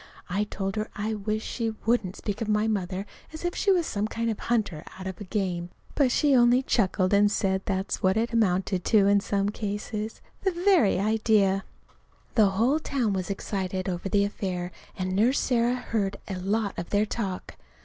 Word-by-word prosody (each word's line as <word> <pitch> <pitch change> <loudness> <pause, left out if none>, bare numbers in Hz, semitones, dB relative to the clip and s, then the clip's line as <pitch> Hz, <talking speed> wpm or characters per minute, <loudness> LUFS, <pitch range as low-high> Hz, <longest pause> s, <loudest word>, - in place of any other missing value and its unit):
(I 200 +3 +1
told 195 -1 -4
her 215 +1 -2
I 215 +1 -2
wished 215 +1 -2
she 225 -2 -2
wouldn't 220 -5 +1
speak 205 +1 -4
of 225 - -1
my 210 +1 +2
mother 195 -2 -2 0.3
as 315 +2 -7
if 350 - 0
she 400 - +2
was 355 -3 +3
some 210 -5 -1
kind 230 +1 -1
of 215 - -5
a - - -9
hunter 205 -10 0
out 190 - -8
after 190 +2 -6
game; 180 -3 -2 0.2
but 270 -4 +3
she 285 +1 +3
only 245 +1 +5
chuckled 190 -5 +1
and 205 +1 +5
said 190 -2 +1
that's 190 0 -1
about - - -21
what 190 +2 +3
it 230 +1 0
amounted 190 -4 +1
to 210 -3 +5
in 200 0 +5
some 200 0 0
cases.) 210 +1 -4 0.2
The 380 -2 +1
very 345 - +4
idea! 210 -2 +2 0.7
The 215 -4 +5
whole 235 +10 +2
town 255 -9 -1
was 185 -1 -2
excited 190 -1 -3
over 180 +1 -3
the 200 0 +3
affair, 185 -4 -3 0.3
and 185 0 -2
Nurse 235 +7 +3
Sarah 240 -1 +2
heard 215 -5 -2
a 190 -2 -4
lot 200 +2 -1
of 170 - -5
their 205 +1 +2
talk. 200 -4 -4
205 Hz, 195 wpm, -27 LUFS, 190-230 Hz, 0.7 s, only